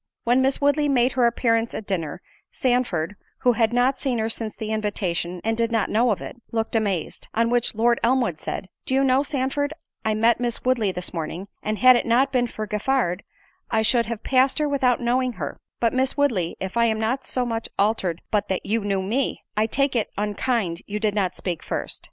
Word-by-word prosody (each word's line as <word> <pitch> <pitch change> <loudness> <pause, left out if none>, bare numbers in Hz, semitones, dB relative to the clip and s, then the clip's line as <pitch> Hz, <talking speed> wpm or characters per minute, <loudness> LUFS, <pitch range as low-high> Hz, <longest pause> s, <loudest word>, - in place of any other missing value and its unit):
When 245 +2 +3
Miss 265 +1 +2
Woodley 290 +1 +2
made 255 -2 +3
her 245 -2 +3
appearance 230 -1 +1
at 220 - -5
dinner, 175 -4 -3 0.3
Sandford, 235 -9 0 0.3
(who 250 - +5
had 225 -1 +2
not 245 +2 +2
seen 260 -4 0
her 220 0 0
since 225 -1 -4
the 220 0 -5
invitation, 185 -5 -2
and 225 0 +1
did 230 0 0
not 225 -3 0
know 235 +3 +3
of 205 - 0
it) - - -7
looked 225 0 -1
amazed; 200 -7 -1
on 230 +1 +2
which 245 -2 +1
Lord 235 +2 +3
Elmwood 235 -9 +1
said, - - -5 0.2
"Do 260 - +1
you 270 - +3
know, 265 0 +4
Sandford, 285 +1 -1 0.3
I 215 -1 +1
met 230 +2 +3
Miss 240 -1 -2
Woodley 235 -6 +2
this 180 -1 -6
morning, 170 +3 -5
and 215 0 -2
had 255 +2 +7
it 240 - 0
not 255 +4 +3
been 245 -2 +2
for 215 -2 -5
Giffard, 210 -3 0 0.5
I 220 - +2
should 235 +1 +3
have 230 -2 -5
passed 260 0 +3
her 300 -1 +1
without 260 -4 +2
knowing 250 +1 +1
her—but 230 0 -3
Miss 260 +2 +1
Woodley, 225 -13 +1
if 190 +4 -4
I 235 - +4
am 220 -1 +1
not 230 +5 0
so 250 -1 -1
much 230 -1 -3
altered 195 -5 0
but 210 -2 +1
that 190 - -2
you 220 +1 0
knew 195 -2 0
me, 240 +8 -1
I 215 +1 +2
take 275 +3 +1
it 225 - 0
unkind 210 -3 -1
you 210 +1 -3
did 210 -1 +1
not 195 -3 0
speak 175 -4 -3
first." - - -4
230 Hz, 210 wpm, -24 LUFS, 210-255 Hz, 0.5 s, had